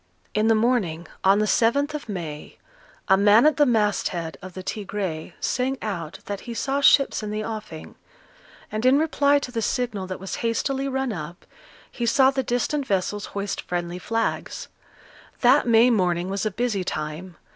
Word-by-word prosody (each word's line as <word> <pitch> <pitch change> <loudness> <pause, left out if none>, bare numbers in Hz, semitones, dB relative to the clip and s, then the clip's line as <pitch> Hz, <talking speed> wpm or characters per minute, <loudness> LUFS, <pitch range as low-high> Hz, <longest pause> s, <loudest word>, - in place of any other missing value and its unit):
In 215 +1 +2
the 225 - +5
morning, 215 -8 0 0.2
on 195 +1 +5
the 215 - +2
7th 280 +8 +2
of 295 -6 -6
May, 165 -7 -6 0.5
a 190 - +6
man 205 +5 +5
at 305 -2 +4
the 295 -1 +4
masthead 205 - 0
of 185 -1 -10
the 185 - -6
Tigre 195 -6 -4
sang 260 +2 -1
out 175 -5 -5
that 200 -1 -4
he 235 - -5
saw 275 +4 -1
ships 275 -3 +4
in 210 - -5
the 215 +1 -3
offing; 215 -8 -7 0.8
and 215 +1 -3
in 260 +2 +5
reply 290 -2 +3
to 280 -3 -4
the 230 -2 -2
signal 220 -5 -2
that 185 - -5
was 190 +1 -5
hastily 265 +4 -1
run 265 -3 -1
up, 170 0 -8 0.5
he 235 - -3
saw 265 +2 +5
the 270 -1 -1
distant 265 +3 -1
vessels 200 +1 -1
hoist 200 0 -3
friendly 175 0 -4
flags. 225 +4 -3 0.7
That 255 +2 +5
May 235 +2 +5
morning 180 -3 +1
was 200 +2 -1
a - - +1
busy 215 -2 -1
time. 155 +1 -5
215 Hz, 175 wpm, -24 LUFS, 185-250 Hz, 0.8 s, a